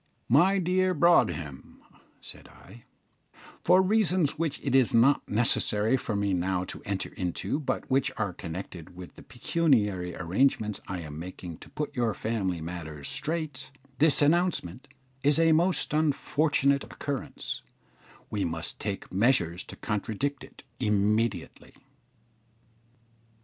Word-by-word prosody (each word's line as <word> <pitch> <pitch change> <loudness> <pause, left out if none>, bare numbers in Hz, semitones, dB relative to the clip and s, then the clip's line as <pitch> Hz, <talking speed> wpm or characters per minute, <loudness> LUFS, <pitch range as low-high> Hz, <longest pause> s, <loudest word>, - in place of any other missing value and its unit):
"My 180 +10 +5
dear 185 0 +1
Broadhem," 90 - +1 0.4
said - - -10
I, 115 +5 -16 0.8
"for 185 +2 +5
reasons 185 -7 +2
which 155 -3 -1
it 135 - -1
is 130 -4 +4
not 130 +5 +4
necessary 110 +1 +2
for 115 -4 -3
me 100 -1 0
now 90 0 0
to - - -8
enter 100 -1 -3
into, 90 - -2
but 150 - -3
which 135 0 +1
are 100 -4 -1
connected 90 0 -8
with 90 -1 -10
the - - -14
pecuniary 105 - 0
arrangements 105 +4 0
I 95 -3 -4
am 75 -1 -8
making 90 -1 -8
to - - -13
put 150 - -5
your 120 -4 0
family 95 -7 -2
matters 80 -3 -6
straight, 155 -4 -3 0.3
this 150 -1 +5
announcement 155 - +1 0.3
is 145 +2 +3
a 165 0 +4
most 170 0 +2
unfortunate 145 -2 +2
occurrence 140 -2 -5 0.7
we 105 -2 -1
must 80 0 -4
take 100 -3 -5
measures 90 -5 +2
to - - -10
contradict 115 +6 -3
it - - -14 0.2
immediately." 105 -3 0
115 Hz, 130 wpm, -28 LUFS, 95-150 Hz, 0.8 s, My